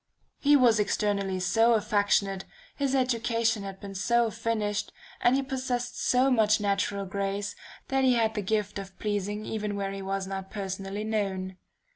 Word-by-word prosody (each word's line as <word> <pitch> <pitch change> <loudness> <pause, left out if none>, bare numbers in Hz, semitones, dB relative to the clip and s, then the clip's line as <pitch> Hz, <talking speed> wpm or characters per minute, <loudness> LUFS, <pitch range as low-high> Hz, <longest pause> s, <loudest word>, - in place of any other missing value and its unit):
"He 290 0 +5
was 240 -5 +5
externally 200 -2 0
so 225 +6 +4
affectionate, 205 -2 +1 0.3
his 275 -1 0
education 230 -3 +1
had 195 -1 -7
been 200 -1 -8
so 230 +4 +2
finished, 215 -2 -2 0.3
and 245 - +4
he 275 - +1
possessed 255 -2 -3
so 255 +2 +3
much 215 -3 +4
natural 200 -1 0
grace, 200 +1 -3 0.3
that 270 0 +2
he 255 -1 +5
had 225 -2 +2
the 210 - -2
gift 205 0 -1
of 195 -1 -9
pleasing 205 0 -2
even 210 -2 -3
where 195 -1 -2
he 195 0 -5
was 195 0 -2
not 190 0 -5
personally 195 0 -4
known. 195 -4 -2
210 Hz, 160 wpm, -28 LUFS, 195-230 Hz, 0.3 s, He